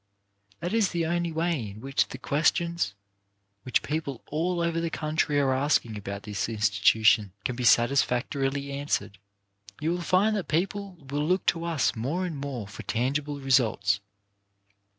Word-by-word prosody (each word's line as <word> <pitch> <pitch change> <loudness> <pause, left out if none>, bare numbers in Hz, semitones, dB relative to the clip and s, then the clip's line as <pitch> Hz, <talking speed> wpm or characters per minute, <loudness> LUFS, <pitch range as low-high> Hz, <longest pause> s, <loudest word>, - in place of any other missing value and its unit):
That 175 +4 -2
is 225 -4 +3
the 170 -2 -1
only 170 0 0
way 160 -8 -1
in 100 +2 -10
which 135 +3 0
the - - -8
questions 160 - +1 0.7
which 130 - 0
people 145 -5 -3
all 170 +4 0
over 170 0 0
the 165 - -1
country 155 -2 0
are 135 -2 +2
asking 130 -4 +1
about 100 -1 -6
this 105 -1 -3
institution 105 -1 +3
can 125 - -1
be 125 - -4
satisfactorily 135 +3 +2
answered. 140 -8 -2 0.6
You 155 +2 0
will 175 0 -2
find 195 +5 +3
that 200 - -3
people 195 +3 -1
will 145 +1 0
look 185 +1 +1
to 165 0 -6
us 165 -8 +1
more 145 +11 -1
and 170 -4 -4
more 135 -7 -5
for 100 - -9
tangible 140 +5 -1
results. 110 -7 +2
140 Hz, 155 wpm, -27 LUFS, 120-170 Hz, 0.7 s, is